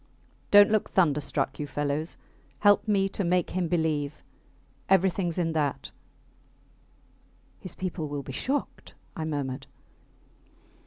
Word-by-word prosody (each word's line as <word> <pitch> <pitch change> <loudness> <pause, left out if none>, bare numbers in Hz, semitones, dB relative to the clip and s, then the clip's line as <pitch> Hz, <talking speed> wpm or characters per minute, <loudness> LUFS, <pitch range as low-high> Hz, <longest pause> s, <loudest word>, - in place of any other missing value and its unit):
Dont 205 0 +7
look 215 -1 +1
thunderstruck, 150 -5 +1
you 145 - -3
fellows. 145 +3 -2 0.4
Help 205 +2 +5
me 195 -2 +3
to 200 - -3
make 180 0 +1
him 180 -1 -1
believe 155 -3 -1 0.7
everythings 185 -2 +2
in 165 -2 0
that. 150 -4 -2 1.7
His 185 - -7
people 180 -4 -4
will 145 -1 -4
be 135 - -7
shocked, 275 - -3 0.2
I 160 -4 -3
murmured. 140 -3 -3
165 Hz, 115 wpm, -27 LUFS, 145-190 Hz, 1.7 s, Dont